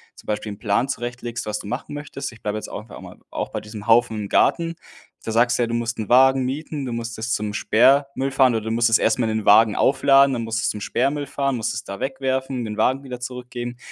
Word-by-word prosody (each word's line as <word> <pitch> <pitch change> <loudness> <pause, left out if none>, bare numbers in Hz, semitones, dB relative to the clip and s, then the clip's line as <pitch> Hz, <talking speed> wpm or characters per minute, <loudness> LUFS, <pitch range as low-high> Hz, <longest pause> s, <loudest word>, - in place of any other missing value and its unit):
zum - - -17
Beispiel 105 0 -3
'n 100 - -9
Plan 110 +4 0
zurechtlegst, 120 -2 -4
was 105 0 -3
du 100 - -9
machen 125 +5 -5
möchtest? 145 -3 -6
Ich 115 - -16
bleibe 105 0 -2
jetzt 110 - -6
auch 105 +3 -8
einmal - - -11
auch - - -4
bei - - -5
diesem 105 0 -9
Haufen 115 -1 +4
im 105 -2 -5
Garten. 165 -1 +2 0.5
Da 110 - -4
sagst 120 +2 +3
du 120 - +2
ja, 115 - 0
du 115 - -4
musst 120 0 -2
'n 110 - -4
Wagen 130 +1 +5
mieten, 145 +2 -4
du 125 - -4
musst 115 0 -5
es 115 +2 -3
zum 105 0 -2
Sperrmüll 135 +5 +3
fahren 130 -3 +4
oder 110 - -2
du 110 - -2
musst 115 0 +2
es 115 - +5
erst - - +1
mal 115 -2 +1
in 110 - 0
den 105 - -8
Wagen 110 +1 +6
aufladen, 135 0 +4
dann 120 -2 -2
musst 115 0 -2
es - - +2
zum 105 - -4
Sperrmüll 140 +6 -1
fahren, 140 -1 -1
musst 110 - -2
es 110 - -5
da 100 -2 -7
wegwerfen, 130 -2 -2
den 105 -1 -5
Wagen 130 +5 +1
wieder 125 -2 -7
zurückgehen. 125 -1 -6
120 Hz, 255 wpm, -22 LUFS, 110-135 Hz, 0.5 s, Wagen